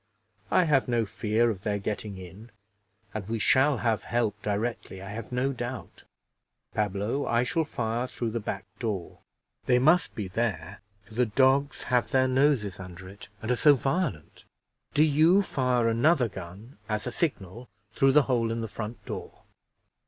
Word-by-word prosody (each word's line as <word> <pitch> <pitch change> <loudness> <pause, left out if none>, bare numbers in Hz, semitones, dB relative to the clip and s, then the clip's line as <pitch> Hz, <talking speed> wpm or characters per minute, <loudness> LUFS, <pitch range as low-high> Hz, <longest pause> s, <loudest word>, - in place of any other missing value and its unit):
I 185 - +4
have 145 -5 +2
no 120 -2 +1
fear 110 +2 +1
of 95 -4 -7
their 105 0 -1
getting 100 0 -4
in, 95 +5 -11 0.6
and 110 -2 -5
we 115 - -1
shall 135 +4 +3
have 115 -1 0
help 120 -3 -1
directly, 105 -2 -3
I 95 +1 -8
have 115 +2 -7
no 130 +2 0
doubt. 120 0 -7 0.7
Pablo, 105 +6 -1
I 120 +1 +2
shall 160 +6 0
fire 120 -2 -2
through 115 -2 -3
the 115 - -2
back 105 -1 -5
door; 105 -7 -4 0.5
they 125 - +5
must 155 +8 +3
be 105 -4 -3
there, 95 -3 -3 0.2
for 110 - -16
the 125 +2 +2
dogs 135 +5 +2
have 125 -1 +1
their 130 -1 +3
noses 130 -8 +2
under 90 0 -9
it, 100 +2 -12
and 110 - -1
are - - +3
so 145 +4 +6
violent. 135 - -2 0.5
Do 150 - +6
you 160 +6 +5
fire 125 -8 +1
another 125 +4 +3
gun, 95 +6 -10
as 105 0 -1
a 125 - -3
signal, 120 - -3 0.2
through 135 +4 +3
the 150 0 +6
hole 120 -4 0
in 115 0 -2
the 115 - -3
front 110 +2 -7
door." - - -7
115 Hz, 170 wpm, -27 LUFS, 105-130 Hz, 0.7 s, so